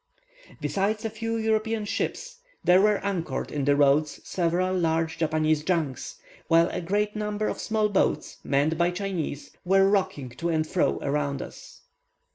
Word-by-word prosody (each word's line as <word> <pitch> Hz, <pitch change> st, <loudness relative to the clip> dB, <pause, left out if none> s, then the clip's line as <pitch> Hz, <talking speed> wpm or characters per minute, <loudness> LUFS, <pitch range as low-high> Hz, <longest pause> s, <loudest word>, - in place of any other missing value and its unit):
Besides 210 Hz, +3 st, -1 dB
a 220 Hz, -, -2 dB
few 225 Hz, +1 st, -3 dB
European 220 Hz, 0 st, 0 dB
ships, 470 Hz, -, -3 dB, 0.2 s
there 180 Hz, +1 st, +6 dB
were 210 Hz, 0 st, +4 dB
anchored 170 Hz, -9 st, -2 dB
in 145 Hz, -2 st, -2 dB
the 145 Hz, 0 st, +4 dB
roads 145 Hz, +1 st, +3 dB
several 180 Hz, +1 st, 0 dB
large 165 Hz, -2 st, 0 dB
Chinese 155 Hz, -1 st, +1 dB
junks, 160 Hz, -7 st, -2 dB, 0.3 s
while 165 Hz, +1 st, +4 dB
a -, -, -3 dB
great 205 Hz, +4 st, -1 dB
number 210 Hz, 0 st, -2 dB
of -, -, -3 dB
small 215 Hz, -1 st, +1 dB
boats, 200 Hz, -2 st, 0 dB
manned 145 Hz, +4 st, +1 dB
by 170 Hz, 0 st, +3 dB
Chinese, 175 Hz, -6 st, -4 dB
were 195 Hz, +1 st, +4 dB
rocking 190 Hz, -10 st, 0 dB
to 165 Hz, +8 st, -4 dB
and 160 Hz, -1 st, +1 dB
fro 175 Hz, +3 st, +1 dB
around 140 Hz, -1 st, -1 dB
us. -, -, -12 dB
175 Hz, 155 wpm, -26 LUFS, 155-210 Hz, 0.3 s, there